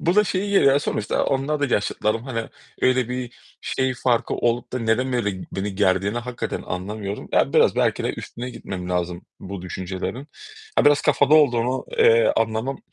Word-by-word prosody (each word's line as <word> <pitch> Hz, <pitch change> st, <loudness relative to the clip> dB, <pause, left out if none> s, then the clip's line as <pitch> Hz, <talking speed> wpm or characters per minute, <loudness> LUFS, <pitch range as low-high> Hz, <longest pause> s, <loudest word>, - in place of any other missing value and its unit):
bu 175 Hz, +2 st, +1 dB
da 210 Hz, -, +6 dB
şeye 195 Hz, +1 st, -1 dB
geliyor. 195 Hz, -9 st, +5 dB
Ya 140 Hz, -, +4 dB
sonuçta 105 Hz, -, -1 dB
onlar 140 Hz, +2 st, 0 dB
da 140 Hz, -3 st, +1 dB
yaşıtlarım, 105 Hz, +2 st, -1 dB
hani, 115 Hz, -4 st, -4 dB, 0.3 s
öyle 130 Hz, -2 st, +2 dB
bir 125 Hz, -1 st, -4 dB, 0.3 s
şey 130 Hz, -1 st, -1 dB
farkı 120 Hz, -2 st, 0 dB
olup 120 Hz, +1 st, -1 dB
da, 130 Hz, -, -1 dB
neden 120 Hz, +3 st, 0 dB
böyle 105 Hz, -6 st, -1 dB
beni 95 Hz, +1 st, -3 dB
gerdiğini 100 Hz, +2 st, +1 dB
hakikaten 120 Hz, 0 st, -4 dB
anlamıyorum. 100 Hz, +2 st, -5 dB
Ya -, -, +2 dB
biraz -, -, +4 dB
belki -, -, +1 dB
de -, -, 0 dB
üstüne 125 Hz, +2 st, -7 dB
gitmem 90 Hz, -6 st, -6 dB
lazım 90 Hz, 0 st, -2 dB, 0.2 s
bu 95 Hz, -1 st, -7 dB
düşüncelerin. 95 Hz, +9 st, -5 dB, 0.5 s
Ya -, -, +4 dB
biraz 145 Hz, 0 st, +5 dB
kafada 145 Hz, +2 st, +4 dB
olduğunu, 125 Hz, -4 st, +3 dB
eee, 470 Hz, +1 st, +5 dB
anlamam, 115 Hz, +4 st, -1 dB
120 Hz, 170 wpm, -23 LUFS, 100-135 Hz, 0.5 s, da